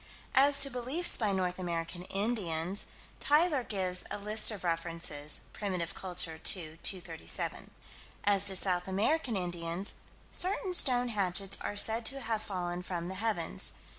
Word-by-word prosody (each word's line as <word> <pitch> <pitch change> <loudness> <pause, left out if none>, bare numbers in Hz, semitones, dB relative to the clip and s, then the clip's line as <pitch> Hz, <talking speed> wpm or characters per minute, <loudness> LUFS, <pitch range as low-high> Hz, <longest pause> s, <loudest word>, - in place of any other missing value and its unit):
As 280 +1 +5
to 275 - +8
beliefs 260 +8 +4
by 215 -4 0
North 185 -1 -2
American 170 -1 -4
Indians, 195 -4 -2 0.3
Tyler 300 -1 +2
gives 185 -4 0
a - - -3
list 210 +2 +3
of 210 -4 -3
references 165 -3 -1
(Primitive 185 -5 -3
Culture, 175 -3 +1
2 160 -4 +5
237). 175 -4 -2 0.5
As 200 -1 +3
to 195 - +3
South 180 -1 -1
American 225 +7 0
Indians 175 0 -3 0.4
"Certain 370 0 -2
stone 250 -7 +4
hatchets 195 -2 -1
are 205 - -4
said 225 +3 +2
to 275 +2 -3
have 225 -4 -2
fallen 180 -3 -4
from 175 -1 -5
the - - -4
heavens." 215 -7 -1
195 Hz, 140 wpm, -31 LUFS, 175-225 Hz, 0.5 s, to